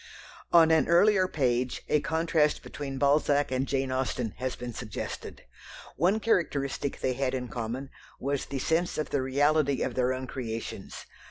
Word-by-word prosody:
On 165 -1 +7
an 160 -1 +4
earlier 185 +2 +5
page 125 -6 0
a 150 - +3
contrast 160 -2 +1
between 135 -2 -6
Balzac 145 0 +2
and 130 +1 0
Jane 135 -1 -1
Austen 130 -3 -1
has 130 0 -3
been 120 -1 -6
suggested. 105 -1 -6 0.5
One 185 +8 +2
characteristic 145 -10 0
they 130 - +1
had 130 0 -1
in 125 -1 -4
common 120 +4 -4 0.3
was 140 0 -2
the 140 - -4
sense 165 +6 0
of 155 - -3
the 140 - +1
reality 140 +1 +2
of 130 - -2
their 125 0 +1
own 130 0 -3
creations. 115 -3 -6
140 Hz, 160 wpm, -28 LUFS, 130-155 Hz, 0.5 s, On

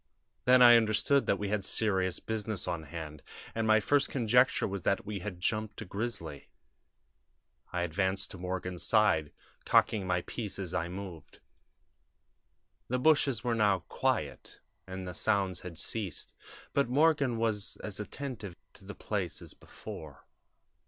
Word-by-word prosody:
Then 125 0 +7
I 120 -1 +10
understood 115 +5 +2
that 100 - +3
we 100 0 -3
had 105 -1 0
serious 95 -5 +1
business 110 -3 -3
on 85 -3 -3
hand, 75 -1 -7 0.3
and 115 -1 -1
my 110 0 +6
first 140 +6 +2
conjecture 125 0 +3
was 100 -1 -4
that 100 +3 0
we 105 -1 -4
had 90 -1 -6
'jumped' 110 +3 -1
a - - -11
grizzly. 100 - -5 1.2
I 90 -1 -1
advanced 95 +3 0
to 95 - -9
Morgan's 90 -1 -4
side, 105 -9 +3 0.3
cocking 100 -4 +3
my 90 -1 +1
piece 110 -5 -5
as 95 -3 -4
I 85 - -1
moved. 90 -4 -8 1.5
"The 125 - 0
bushes 135 -4 +3
were 120 - +1
now 105 -5 +3
quiet, - - -2 0.3
and 95 0 -6
the 90 - -5
sounds 95 -3 +1
had 90 -3 -9
ceased, 105 -3 -3 0.4
but 140 -3 +2
Morgan 140 -3 +3
was 110 -3 -1
as 105 -1 -4
attentive 105 -5 -6 0.2
to - - -16
the - - -8
place - - -3
as - - -6
before. 75 -4 -10
100 Hz, 150 wpm, -31 LUFS, 90-115 Hz, 1.5 s, I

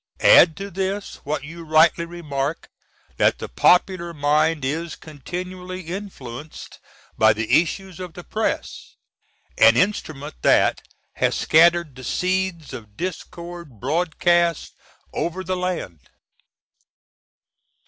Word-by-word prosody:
Add - - +7
to 200 0 -6
this, 195 +2 -3
what 145 +1 -2
you 165 +3 -9
rightly 160 +1 +4
remark, 155 -3 -4 0.5
that - - +3
the - - -6
popular 175 - +2
mind 150 0 +1
is 160 +5 -3
continually 180 +4 -7
influenced 160 - -8 0.4
by 110 0 +6
the 115 +8 +3
issues 185 +2 -7
of 180 -3 -8
the 175 - -9
Press 220 +5 -3 0.6
an - - +7
instrument 155 -8 -1
that - - +3 0.4
has - - +1
scattered 170 -2 +4
the 130 - -11
seeds 180 -1 -2
of 110 -5 -10
discord 170 - -7
broadcast 170 - +1 0.4
over 175 +3 -3
the 185 0 -2
land. 180 - -3
170 Hz, 110 wpm, -22 LUFS, 150-180 Hz, 0.6 s, Add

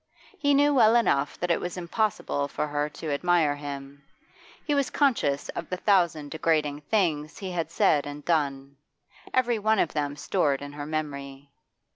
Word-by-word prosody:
He 285 -3 +3
knew 290 +1 +4
well 230 -4 +5
enough 145 -12 +2
that 175 0 0
it 170 - +1
was 180 0 -4
impossible 180 -5 -1
for 145 - -2
her 145 0 -2
to: 150 0 -5
admire 160 -1 +2
him; 140 -1 -8 0.6
he 295 - 0
was 280 -2 +1
conscious 230 - +1
of - - -6
the 180 - -2
thousand 170 -7 +2
degrading 155 -2 0
things 160 -8 0
he 190 -2 -5
had 170 -2 -2
said 145 -1 +2
and 145 0 -8
done, 140 -4 -1 0.5
every 240 -3 +1
one 220 +1 +2
of 170 - +1
them 145 -1 -2
stored 145 -3 0
in 145 0 -8
her 145 0 -6
memory. 140 -3 -5
155 Hz, 170 wpm, -26 LUFS, 145-190 Hz, 0.6 s, well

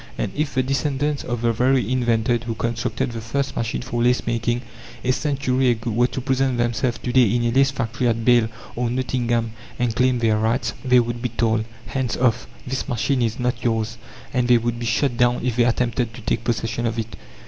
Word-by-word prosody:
And - - -2
if 150 -1 -2
the 130 - +3
descendants 140 +2 -1
of 120 -1 -3
the 115 -1 +3
very 125 +2 +2
inventor 120 -2 +2
who 115 -2 -3
constructed 115 +1 -2
the 115 -1 -5
first 135 +5 -2
machine 115 +1 -2
for 120 -2 -2
lace 125 +1 +2
making, 120 +1 -1 0.4
a 130 - +2
century 135 -2 +1
ago, 115 0 -1
were 120 +3 +3
to 125 - -5
present 130 -1 0
themselves 120 +1 0
to 120 - -2
day 125 -5 +5
in 120 - +1
a 120 - +2
lace 135 +2 +4
factory 120 -1 -2
at 115 -1 0
Bâle 120 -3 +5 0.3
or 120 0 -1
Nottingham, 120 -2 0 0.3
and 120 -2 0
claim 125 0 +3
their 110 -2 +2
rights, 115 +4 0
they 125 -1 +5
would 120 0 -2
be 125 - -1
told: 110 -1 0 0.2
"Hands 130 -3 -2
off! 125 -1 +1 0.2
this 130 +2 -3
machine 125 +2 0
is 115 0 0
not 125 -1 -1
yours," 115 -1 -1 0.3
and 125 -1 +1
they 120 -1 +6
would 120 0 -2
be 120 - -3
shot 120 +1 +1
down 120 0 +3
if 125 -3 0
they 120 - +5
attempted 120 -1 0
to 125 - -9
take 110 - -1
possession 115 0 -1
of 115 0 -3
it. 115 -1 -4
120 Hz, 215 wpm, -22 LUFS, 115-130 Hz, 0.4 s, they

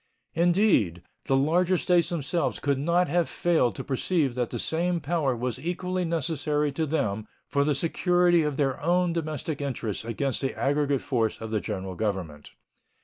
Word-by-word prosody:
Indeed, 170 - +2 0.2
the 135 - +2
larger 175 +6 +2
States 175 0 +2
themselves 170 0 -1
could 140 -2 0
not 170 +5 +2
have 175 -1 +1
failed 160 - +1
to - - -5
perceive 140 0 0
that 125 -1 -1
the 120 - -4
same 170 +7 0
power 145 -4 0
was 125 +2 -3
equally 180 +1 -2
necessary 150 -2 0
to 155 +3 -2
them 110 -8 -1 0.2
for 140 -1 +1
the 145 0 +1
security 175 +2 +3
of 150 -2 -1
their 135 -3 0
own 175 +2 +2
domestic 155 -2 -3
interests 120 -8 -3
against 115 +4 -2
the 135 - -2
aggregate 145 -1 +1
force 115 -5 -1
of 110 -1 -6
the 110 - +1
General 95 -3 -4
Government. 90 -7 -3
145 Hz, 165 wpm, -26 LUFS, 125-170 Hz, 0.2 s, security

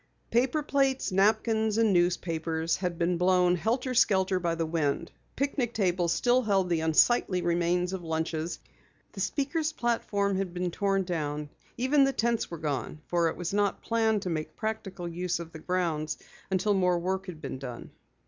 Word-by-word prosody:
Paper 260 +6 +2
plates, 270 -4 +1
napkins 220 +2 +2
and 225 -3 +4
newspapers 165 -2 0
had 180 -2 -3
been 175 +1 +1
blown 180 0 +4
helter 245 +8 -1
skelter 190 -5 +3
by 170 -2 0
the 165 0 -1
wind. 160 0 -1 0.2
Picnic 270 -3 -1
tables 180 -4 +1
still 245 +5 +3
held 195 -5 +1
the 170 -2 +1
unsightly 180 +3 +3
remains 175 +1 +1
of 190 - -3
lunches. 160 0 -2 0.5
The - - -10
speakers' 310 +2 -1
platform 205 -6 0
had 185 -2 -3
been 180 0 -1
torn 195 +1 +1
down, 150 -4 -3 0.3
even 265 +4 +4
the 270 0 +2
tents 235 -1 0
were 170 - -6
gone, 150 -2 -3
for 170 -1 +1
it - - -6
was 175 +1 -3
not 205 -1 0
planned 220 -3 +1
to 180 - -2
make 155 -1 -4
practical 195 -5 -4
use 175 +1 -2
of 165 -1 -7
the 160 - -9
grounds 165 -3 -1 0.3
until 195 +2 +1
more 180 -2 +2
work 190 +2 -2
had 175 -4 -7
been 130 - -6
done. 125 -3 -8
180 Hz, 170 wpm, -28 LUFS, 170-220 Hz, 0.5 s, and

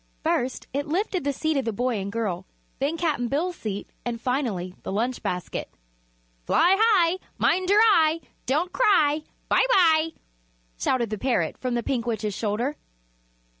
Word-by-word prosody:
First 250 +1 -1
it 285 +2 -2
lifted 370 +2 -1
the 285 - +1
seat 315 +2 -1
of 270 - 0
the 225 - 0
boy 240 +1 -1
and 195 +1 -4
girl, 195 -5 -3 0.3
then 290 +5 0
Cap'n 300 -8 0
Bill's 335 +8 -1
seat 205 - -5 0.2
and 235 -1 -3
finally 230 -9 -2
the - - -5
lunch 235 +5 -1
basket. 180 -1 -3 0.8
"Fly 360 +3 +5
high! 375 -6 +4 0.2
mind 370 0 +2
your 415 +2 +6
eye! 330 -7 +4 0.3
Don't 315 +8 0
cry! 315 -10 +3 0.3
bye - - +4
bye!" 325 -6 +5 0.7
shouted 235 -4 0
the 215 - -3
parrot 255 0 0
from 250 -2 -2
the 235 - -1
Pink 240 -2 -2
Witch's 215 -3 -2
shoulder. 230 +8 -2
270 Hz, 160 wpm, -25 LUFS, 230-330 Hz, 0.8 s, your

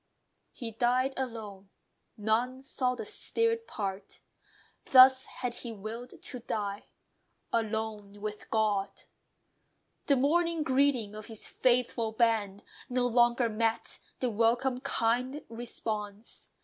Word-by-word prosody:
He 235 -4 -6
died 250 +4 +1
alone: 215 -7 -6 0.5
none 230 +5 0
saw 255 -2 0
the - - -6
spirit 455 +1 +1
part. 195 -2 -5 0.6
Thus 260 0 +8
had 250 -2 -4
he 240 - -5
willed 225 +4 -8
to 250 - -4
die; 205 -3 -4 0.7
alone 220 -2 -2
with 210 0 -6
GOD. 210 -3 0 1.0
The 280 - +5
morning 330 +4 +2
greeting 260 -6 +2
of 215 0 -8
his 220 -2 -6
faithful 240 -3 +1
band 220 -4 +1 0.3
No 250 0 +1
longer 240 0 +4
met 225 +1 -1 0.2
the 250 -2 +1
welcome, 240 +4 +2
kind 255 +2 0
response. 220 -2 -5
235 Hz, 110 wpm, -30 LUFS, 215-255 Hz, 1.0 s, Thus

